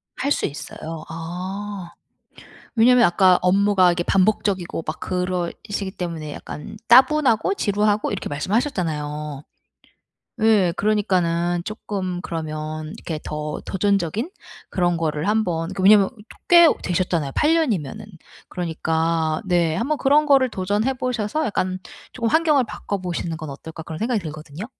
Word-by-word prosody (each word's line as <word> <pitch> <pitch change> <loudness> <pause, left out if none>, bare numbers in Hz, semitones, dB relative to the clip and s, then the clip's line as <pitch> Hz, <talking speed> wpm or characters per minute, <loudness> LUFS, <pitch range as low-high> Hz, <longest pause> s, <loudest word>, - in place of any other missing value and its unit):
할 280 +2 -2
수 - - +1
있어요. 155 +2 -7
아 180 +4 -6 0.9
왜냐하면 245 +1 +6
아까 185 0 +5
업무가 190 0 +4
이렇게 175 0 +1
반복적이고 190 -4 +1
막 155 - -4
그러시기 185 +2 -3
때문에 165 -5 -5
약간 150 - -8
따분하고 260 - +5
지루하고 210 - +1
이렇게 200 - -4
말씀하셨잖아요. 150 - -2 1.0
예 210 -6 +4
그러니까는 175 -5 +1
쪼끔 190 -4 -4
그러면 155 -2 -5
이렇게 160 -2 -5
더 150 0 -4
도전적인 200 - 0 0.4
그런 175 -3 0
거를 155 +1 -1
한번 180 -6 0
그 190 - -4
왜냐하면 200 0 +6 0.4
꽤 340 -1 +8
되셨잖아요 170 -5 -1
8 305 +2 +3
년이면은. 215 - -1 0.5
그러니까 160 -2 -1
네 170 -3 +2
한번 275 - 0
그런 295 +2 +3
거를 270 -3 +4
도전해 205 +6 0
보셔서 250 +3 -2
약간 185 -2 -1 0.3
쪼금 230 -2 -1
'환경을 305 -1 +3
바꿔 205 -2 -5
보시는 175 -3 -4
건 155 -2 -7
어떨까.' 160 +4 -9
그런 160 0 -7
생각이 230 -1 0
들거든요. 155 +2 -7
185 Hz, 320 characters per minute, -22 LUFS, 165-215 Hz, 1.0 s, 꽤